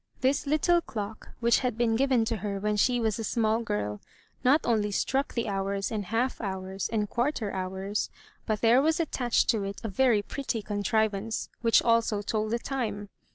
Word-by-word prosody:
This 270 +2 +1
little 340 +4 +3
clock, 215 -7 -6
which 235 0 +4
had 250 -4 -2
been 235 -2 +2
given 255 -2 +3
to 225 0 -1
her 200 0 -3
when 210 +1 0
she 245 +4 +2
was 225 -1 0
a - - -2
small 220 +1 +1
girl, 105 - -3 0.4
not 280 +5 +5
only 215 -3 +1
struck 270 +7 -1
the 235 - -1
hours 195 0 -2
and 210 -3 -2
half 230 +6 -1
hours 190 -1 -3
and 210 -2 0
quarter 240 -3 -1
hours, 190 +2 -2 0.4
but 215 -1 -1
there 235 +3 +5
was 315 +3 +2
attached 250 -7 +1
to 220 -3 -1
it 195 0 -5
a 225 - -2
very 220 0 +3
pretty 235 -3 -3
contrivance 210 +1 -1
which 230 -1 +4
also 230 -3 +2
told 215 +1 -1
the 235 - +1
time. 220 -6 -3
220 Hz, 185 wpm, -28 LUFS, 205-240 Hz, 0.4 s, not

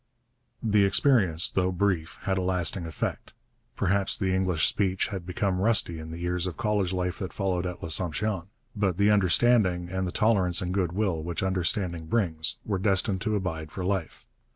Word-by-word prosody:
The 105 -2 +3
experience, 100 - +4
though 95 -1 0
brief, 90 -3 -1
had 95 -1 0
a - - -1
lasting 90 -1 0
effect. 80 - -5 0.4
Perhaps 100 +1 +1
the 95 -3 0
English 95 -4 +1
speech 95 0 0
became 90 +1 -1
rusty 100 -6 +1
in 80 0 -8
the 80 - -7
years 90 +1 -2
of 90 - -6
college 105 -5 0
life 90 -1 -2
that 95 -2 -4
followed 95 -3 -1
at 90 -1 -7
L'Assomption, 90 +3 -2 0.3
but 95 -4 0
the 100 +1 +4
understanding, 95 -2 +3
and 95 0 -2
the - - -3
tolerance 95 -5 +2
and 90 0 -3
goodwill 95 -2 -1
which 85 +3 -4
understanding 90 -2 -1
brings, 80 -7 0
were 100 -3 -1
destined 95 0 +1
to 110 0 -1
abide 80 -6 -4
for 90 +1 -5
life. 95 -3 -3
95 Hz, 170 wpm, -27 LUFS, 90-100 Hz, 0.4 s, experience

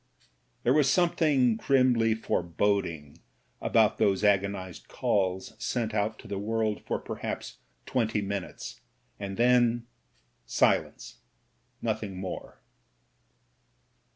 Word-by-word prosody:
There 125 - +4
was 145 -2 +4
something 145 -8 +3
grimly 120 -4 +3
foreboding 85 -6 -1 0.4
about - - +3
those 95 0 +2
agonised 100 -3 0
calls 95 -2 -1
sent 115 -3 -1
out 110 +1 0
to - - -13
the 100 -1 -3
world 110 0 -1
for - - 0
perhaps - - -6 0.3
twenty 110 -4 0
minutes, 100 -2 -5 0.4
and 100 -1 -5
then 120 -1 +3 0.3
— - - -37 0.2
silence, - - +1 0.6
nothing 105 -4 -2
more. 95 -1 -7
110 Hz, 100 wpm, -28 LUFS, 95-120 Hz, 0.6 s, There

